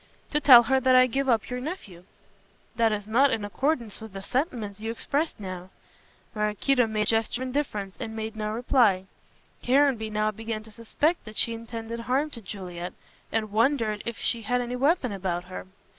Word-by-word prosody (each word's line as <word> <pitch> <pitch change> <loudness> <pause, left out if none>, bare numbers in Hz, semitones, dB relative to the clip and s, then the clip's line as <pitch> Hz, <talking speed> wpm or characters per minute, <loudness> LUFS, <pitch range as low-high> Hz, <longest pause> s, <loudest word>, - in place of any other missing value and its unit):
"To 295 - +2
tell 255 -5 +9
her 265 +3 +2
that 260 0 +4
I 255 0 +8
give 270 +2 -1
up 230 -3 +2
your 250 0 -4
nephew." 210 - -7 0.7
"That 230 -1 +3
is 205 -1 -3
not 260 +6 +4
in 215 -5 -1
accordance 235 0 -1
with 220 -3 -9
the 195 0 -7
sentiments 230 - -2
you 220 +1 -4
expressed 285 +6 -2
now." 185 -2 -7 0.6
Maraquito 215 +4 +1
made 215 -1 0
a - - -3
gesture 225 +3 0
of 260 - -3
indifference 215 -8 -3
and 220 - -5
made 220 0 -4
no 215 -1 -3
reply. 225 -5 +3 0.6
Caranby 255 -4 +3
now 215 0 0
began 220 0 -5
to 220 - -14
suspect 265 +9 -1
that 215 0 -10
she 230 - +1
intended 230 0 -6
harm 265 +6 0
to 235 - -8
Juliet, 180 -3 -6 0.4
and 215 -2 -1
wondered 225 -2 +1
if 235 - -5
she 235 - 0
had 245 +3 0
any 245 0 -3
weapon 275 - +2
about 185 -3 -2
her. 185 +1 -8
225 Hz, 190 wpm, -26 LUFS, 210-255 Hz, 0.7 s, tell